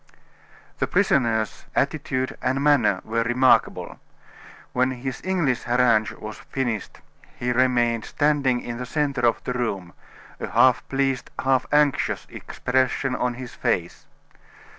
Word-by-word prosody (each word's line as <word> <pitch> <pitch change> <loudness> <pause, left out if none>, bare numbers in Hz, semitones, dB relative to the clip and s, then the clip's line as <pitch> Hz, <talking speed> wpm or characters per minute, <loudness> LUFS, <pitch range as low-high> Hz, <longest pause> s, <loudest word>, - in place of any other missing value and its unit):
The - - +1
prisoner's 115 - +1
attitude 135 -3 -1
and 135 +2 0
manner 145 -10 +3
were 115 +1 -1
remarkable. 125 +3 +2 0.7
When 125 +1 +2
his 130 0 -5
English 170 -10 0
harangue 120 -3 +3
was 110 0 -8
finished, 120 -6 -4 0.4
he 125 0 -1
remained 120 -2 +2
standing 140 -4 +1
in 120 -1 -6
the 125 0 -5
centre 140 -3 0
of 115 - 0
the 125 - -3
room, 100 -8 -3 0.5
a - - -4
half 130 -1 +3
pleased, 135 -1 -1
half 130 -1 +1
anxious 145 -1 +2
expression 130 +1 -1
on 125 -1 -1
his 125 -1 -8
face. - - -2
125 Hz, 125 wpm, -24 LUFS, 120-135 Hz, 0.7 s, manner